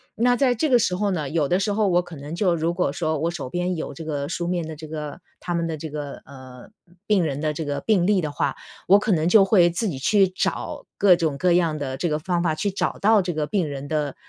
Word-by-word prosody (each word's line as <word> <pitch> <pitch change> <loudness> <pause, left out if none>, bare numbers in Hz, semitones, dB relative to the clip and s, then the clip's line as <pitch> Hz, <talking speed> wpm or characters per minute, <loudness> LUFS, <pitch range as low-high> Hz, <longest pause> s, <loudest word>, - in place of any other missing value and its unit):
那 245 +2 +3
在 255 -1 +3
这 300 +7 0
个 250 - +6
时 180 -4 +1
候 205 +2 0
呢， 155 -6 -2
有 150 -1 0
的 180 - +1
时 205 +1 0
候 210 0 +1
我 175 -2 +3
可 175 -2 -11
能 145 +4 -7
就 180 -3 +2
如 165 +1 0
果 175 -5 0
说 155 +1 -1
我 165 +2 0
手 145 -7 -6
边 180 +2 -1
有 155 - -5
这 165 - -8
个 145 -2 -3
书 175 0 -3
面 175 -2 -2
的 160 - -7
这 155 +1 -10
个 150 +1 -6 0.2
他 175 -1 -3
们 170 - 0
的 160 - -3
这 160 +1 -6
个， 145 -1 -6
呃， 130 -2 -13 0.4
病 205 -4 +3
人 145 0 -3
的 155 - 0
这 155 +1 -4
个 145 -1 -3
病 190 -3 +2
例 200 -2 +3
的 155 -3 -3
话， - - -1 0.3
我 200 +2 +7
可 210 - -1
能 160 0 +1
就 200 +2 +7
会 180 -4 +5
自 195 +6 -2
己 140 - -5
去 195 +6 +3
找 185 - -3
各 195 -3 +6
种 160 -5 -1
各 180 +3 +2
样 170 -3 +2
的 135 -2 -4
这 175 - -1
个 150 0 -1
方 175 +1 -1
法 165 -3 +1
去 200 - -1
找 190 - -2
到 215 0 +4
这 180 -1 -2
个 150 -1 -2
病 180 -1 0
人 140 0 -6
的， 150 -2 -2
170 Hz, 295 characters per minute, -23 LUFS, 150-185 Hz, 0.4 s, 我